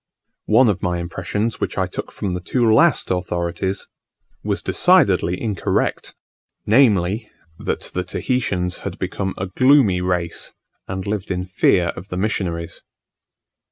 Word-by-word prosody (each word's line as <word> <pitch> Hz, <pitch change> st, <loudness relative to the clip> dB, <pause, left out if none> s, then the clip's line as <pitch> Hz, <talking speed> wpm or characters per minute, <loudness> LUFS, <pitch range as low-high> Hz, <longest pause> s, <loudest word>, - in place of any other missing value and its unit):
One 115 Hz, +4 st, +5 dB
of 100 Hz, -3 st, 0 dB
my 90 Hz, -1 st, 0 dB
impressions 95 Hz, +6 st, -3 dB
which -, -, -3 dB
I -, -, +2 dB
took -, -, -6 dB
from 95 Hz, -3 st, -3 dB
the 90 Hz, -, -3 dB
two 120 Hz, +7 st, 0 dB
last 155 Hz, -, +4 dB
authorities, 90 Hz, +1 st, -2 dB, 0.6 s
was -, -, -1 dB
decidedly 90 Hz, +2 st, +3 dB
incorrect; 105 Hz, -6 st, -1 dB, 0.5 s
viz., 105 Hz, -3 st, +3 dB, 0.3 s
that -, -, -2 dB
the 90 Hz, -, -1 dB
Tahitians 90 Hz, -3 st, -2 dB
had -, -, -6 dB
become 95 Hz, -1 st, -3 dB
a 95 Hz, -, -2 dB
gloomy 110 Hz, -2 st, +4 dB
race, 90 Hz, -2 st, -2 dB, 0.3 s
and 95 Hz, 0 st, -4 dB
lived 100 Hz, -1 st, -3 dB
in 90 Hz, -1 st, -2 dB
fear 90 Hz, -1 st, +2 dB
of 90 Hz, -, -9 dB
the 90 Hz, -, -5 dB
missionaries. 90 Hz, -5 st, -2 dB
95 Hz, 135 wpm, -21 LUFS, 90-105 Hz, 0.6 s, One